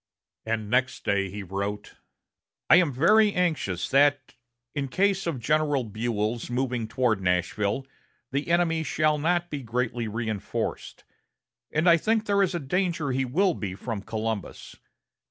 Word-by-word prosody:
And 110 -1 -1
next 125 +4 0
day 100 -1 +1
he 100 +2 -6
wrote: 100 +2 -4 0.8
"I - - +10
am 170 -5 +3
very 205 - +4
anxious 155 - 0
that, 145 -1 +3 0.4
in 145 -2 -2
case 195 +6 +1
of 155 -6 -2
General 145 +2 +1
Buell's 110 +1 -2
moving 125 -2 -1
toward 115 -3 0
Nashville, 95 +7 0 0.5
the 140 +2 -2
enemy 170 -1 +2
shall 155 -1 +1
not 175 +3 0
be 145 -2 -3
greatly 120 -1 -2
reinforced, 110 -2 -4 0.7
and 155 +3 +1
I 170 -1 +7
think 220 +5 +1
there 200 -1 +2
is 190 -1 +1
danger 170 -1 -1
he 130 +1 0
will 180 +9 +2
be 95 -9 -5
from 110 0 -5
Columbus. 110 -1 -5
130 Hz, 140 wpm, -26 LUFS, 110-165 Hz, 0.8 s, I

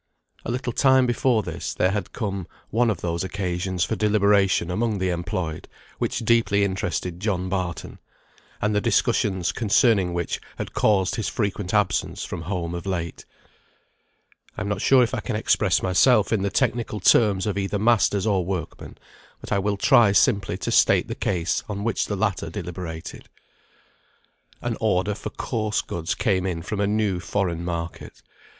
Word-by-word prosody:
A - - -6
little 125 0 -2
time 130 0 +4
before 120 -2 +1
this, - - -5
there 90 - +2
had 105 0 -3
come 100 -5 -4 0.2
one 120 +2 +2
of 95 -6 -2
those 85 0 -2
occasions 90 -2 -2
for 110 - -1
deliberation 100 -4 +2
among 110 +2 0
the 95 -1 0
employed, 85 -2 -4 0.3
which 115 - -2
deeply 115 -3 +3
interested 95 -2 -2
John 95 -2 -1
Barton; 90 -4 -4 0.6
and 105 0 0
the 105 - +1
discussions 95 -4 +1
concerning 105 -4 +2
which 85 -1 -2 0.2
had - - -5
caused 95 -3 +2
his 110 - -2
frequent 100 -3 -2
absence 105 -3 0
from 85 - -6
home 85 -1 -3
of 85 +2 -5
late. 85 -3 -4 1.3
I - - -3
am 105 - -3
not 100 -1 -2
sure 130 -2 +5
if 120 +2 -2
I 130 - -1
can 110 +2 -4
express 105 -3 +2
myself 105 +4 +4
in 105 - +1
the 100 - 0
technical 115 -1 -1
terms 100 0 +4
of 105 - -1
either 100 +1 -1
masters 105 -2 +2
or 100 -4 +2
workmen, 90 -3 -5 0.4
but - - -11
I 100 - +2
will 100 +1 -1
try 100 0 +5
simply 100 0 +2
to - - -3
state - - +4
the - - -2
case 85 -1 -1
on 100 -1 -4
which 115 0 0
the 105 - -2
latter 100 -1 -1
deliberated. 85 -2 -7 1.3
An - - -2
order 95 +3 +1
for 105 - -6
coarse 110 -1 -2
goods 85 +1 -3
came 95 -5 0
in 85 -3 -3
from 105 +3 -4
a 100 - +2
new 105 -3 0
foreign 90 -3 -2
market. 85 -1 -6
100 Hz, 170 wpm, -24 LUFS, 90-110 Hz, 1.3 s, sure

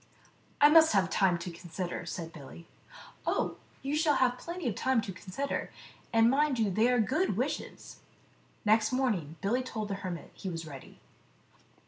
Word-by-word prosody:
" - - -34
I 290 - +10
must 320 -1 +7
have 190 -2 +2
time 190 -4 +3
to 170 +1 -6
consider," 175 +1 -5
said 165 -2 -5
Billy. 155 +2 -11 0.6
"Oh, - - 0 0.3
you 275 +2 -1
shall 305 -1 +3
have 250 -1 +2
plenty 340 -3 -5
of 230 - 0
time 260 +4 +1
to 200 - -5
consider,, 185 +10 -4 0.4
and 225 0 +5
mind 275 +1 +2
they 220 +2 +2
are 245 - +3
good 310 - +1
wishes." - - -4 0.7
Next 215 +1 +4
morning 215 - 0
Billy 230 +6 +1
told 220 -5 -5
the - - -1
hermit 180 -3 -6
he 190 - -6
was 165 -2 -5
ready. 140 -4 -11
215 Hz, 165 wpm, -30 LUFS, 180-260 Hz, 0.7 s, I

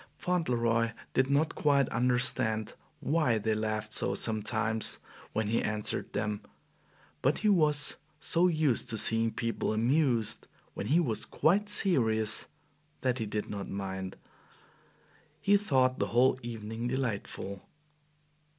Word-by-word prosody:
Fauntleroy 115 -10 0 0.2
did 130 +1 +2
not 145 +3 +2
quite 140 -3 +2
understand 120 -2 +1 0.3
why 150 -7 +2
they 110 +1 0
laughed 110 0 -3
so - - 0
sometimes 110 0 +1 0.3
when 110 - -1
he 110 +3 +1
answered 105 0 -1
them, 105 0 -2 0.8
but 135 +3 +2
he - - +5
was 150 -6 +3 0.2
so 170 +2 +2
used 155 -8 0
to 115 - -3
seeing 115 +1 +3
people 115 -1 -2
amused 115 -2 +1 0.3
when 100 - -5
he 155 +8 +4
was 125 -11 -1
quite 200 +6 +1
serious, 110 - +1 0.5
that 130 -1 0
he 110 - -2
did 105 0 -3
not 100 -1 -6
mind. 95 -1 -5 1.2
He 200 - +3
thought 130 -10 +2
the - - 0
whole 130 +2 +3
evening 115 0 -5
delightful. 110 -6 -3
115 Hz, 125 wpm, -30 LUFS, 110-140 Hz, 1.2 s, he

